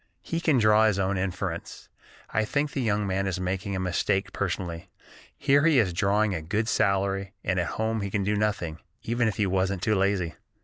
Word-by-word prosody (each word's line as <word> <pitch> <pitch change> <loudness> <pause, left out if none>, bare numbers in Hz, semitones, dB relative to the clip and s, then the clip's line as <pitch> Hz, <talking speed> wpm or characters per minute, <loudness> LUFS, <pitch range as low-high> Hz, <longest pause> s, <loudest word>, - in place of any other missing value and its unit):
He 165 - -2
can 155 -5 +3
draw 110 -1 +5
his 105 -3 +1
own 95 0 0
inference. 95 -2 -4 0.4
I - - +1
think 140 +6 -1
the 135 - -2
young 105 -3 +1
man 95 0 -1
is 95 -1 -2
making 95 +2 -2
a - - -2
mistake 95 +1 0
personally. 85 0 -3 0.5
Here 140 0 +3
he 155 -3 +4
is 100 -8 +3
drawing 105 +3 +2
a 80 - -3
good 105 +7 -1
salary, 100 -2 +1
and 90 0 0
at 85 - 0
home 110 0 0
he 100 - -3
can 100 0 -1
do 105 +2 +1
nothing, 100 -7 -1 0.2
even 120 +1 +1
if 110 - -1
he 105 - +1
wasn't 95 0 0
too 110 - +2
lazy." 95 -4 +1
100 Hz, 205 wpm, -27 LUFS, 95-110 Hz, 0.5 s, draw